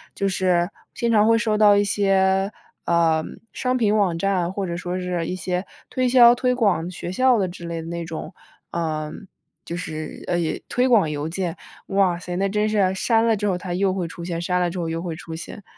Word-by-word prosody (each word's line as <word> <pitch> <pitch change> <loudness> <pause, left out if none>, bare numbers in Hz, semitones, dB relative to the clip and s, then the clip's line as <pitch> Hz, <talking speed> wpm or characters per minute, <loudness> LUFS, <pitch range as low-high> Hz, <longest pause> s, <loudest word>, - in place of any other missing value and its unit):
就 195 0 0
是 180 -1 +1 0.2
经 235 -1 -1
常 215 -1 +4
会 230 - +5
收 220 -2 +1
到 210 -1 +6
一 205 - +4
些， 195 -1 +2 0.3
嗯， 165 -2 +1
商 255 0 -1
品 215 -4 +2
网 190 -5 +2
站， 185 -2 0
或 195 0 -2
者 170 - -3
说 180 +1 -3
是 180 -2 -2
一 180 - -3
些 180 +1 -2 0.2
推 255 0 0
销 240 -1 +8
推 250 0 +1
广 185 -8 +1
学 175 0 -6
校 255 +3 +3
的 190 - +1
之 175 -1 -9
类 165 -1 -4
的 165 - -9
那 170 0 -4
种， 160 +3 -6 0.4
嗯， 155 +2 -3 0.4
就 170 - -5
是， 155 -3 -6
呃， 175 - +1 0.3
推 250 +1 +1
广 215 -10 +4
邮 150 +2 -3
件。 180 -1 -3 0.3
哇 195 -3 +2
塞， 175 0 -6
那 195 +1 +1
真 210 +1 +1
是， 205 -3 +2
删 225 +3 +2
了 225 - +4
之 210 - -3
后 185 -3 +1
它 180 -1 -5
又 190 0 +1
会 185 -3 -2
出 170 +1 -8
现， 170 -1 -3
删 180 +1 0
了 175 -1 +1
之 180 - -5
后 165 - -2
又 165 0 -3
会 170 -3 -4
出 160 0 -8
现。 185 +5 -9
185 Hz, 235 characters per minute, -23 LUFS, 170-205 Hz, 0.4 s, 销